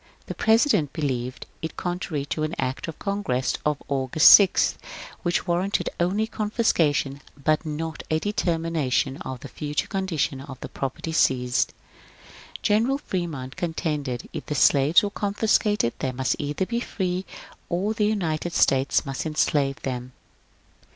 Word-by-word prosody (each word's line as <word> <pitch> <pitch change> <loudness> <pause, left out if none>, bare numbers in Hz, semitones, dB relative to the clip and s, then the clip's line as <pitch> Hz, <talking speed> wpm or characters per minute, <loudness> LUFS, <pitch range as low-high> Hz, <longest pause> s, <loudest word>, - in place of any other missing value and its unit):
The - - -5
Pre 220 - +4
sident 225 - +2
believed 130 -5 -3 0.2
it 160 - -5
contrary 175 -5 -3
to 155 - -3
an 155 +2 -1
Act 130 +5 -2
of 165 - -6
Congress 200 -11 -1
of 150 -1 -1
August 135 +2 +5
6, 200 -3 +6 0.4
which 175 0 0
warranted 180 +3 0
only 190 +5 +1
confiscation, 165 - 0 0.2
but 155 +2 +1
not 155 +1 -4
a 155 - +2
determination 165 -8 0
of 130 -2 -7
the - - -7
future 150 +1 -3
condition 170 -9 -2
of 135 -2 -9
the - - -6
property 135 +4 -4
seized. 125 -6 +2 0.9
General 230 +6 +2
Fremont 160 - -4
contended 150 -8 -2
that - - -15
if - - -15
the 150 - -2
slaves 140 +5 +5
were 205 - -1
confiscated 205 - +1
they 130 - -1
must 130 0 0
either 145 +5 -1
be 235 +4 -2
free 185 -5 -2 0.5
or 190 +5 0
the 215 -2 +1
United 175 -5 -1
States 135 +2 +3
must 135 +3 -3
enslave 145 -3 +1
them. 125 -1 -4
155 Hz, 145 wpm, -25 LUFS, 135-190 Hz, 0.9 s, 6